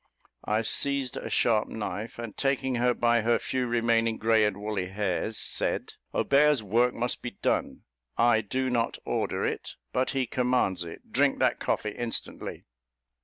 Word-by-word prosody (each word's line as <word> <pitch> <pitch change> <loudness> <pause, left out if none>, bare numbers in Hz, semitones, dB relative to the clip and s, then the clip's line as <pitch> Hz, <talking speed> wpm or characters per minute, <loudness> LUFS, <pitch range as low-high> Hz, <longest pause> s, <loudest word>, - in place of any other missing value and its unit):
I 110 +2 +1
seized 140 +2 -1
a - - -5
sharp 110 -3 +2
knife, 105 0 -5
and 115 -3 -6
taking 135 -1 0
her 125 0 +2
by 120 0 +3
her 115 +1 +3
few 130 -1 -2
remaining 115 -1 +2
grey 110 -1 +3
and 105 -2 -1
woolly 105 -3 -3
hairs, 105 +2 -2
said, - - -2 0.2
"Obeah's 145 -3 +3
work 120 +5 +2
must 120 +1 -1
be 120 -5 -6
done: - - 0 0.3
I 115 -1 +4
do 130 +5 -1
not 120 -1 0
order - - -1
it, - - -3 0.2
but 130 +1 +1
he 135 -2 0
commands 125 -7 +1
it; 85 -1 -11
drink - - +3
that - - +2
coffee 105 - -1
instantly." 120 +2 -3
115 Hz, 160 wpm, -28 LUFS, 105-125 Hz, 0.3 s, I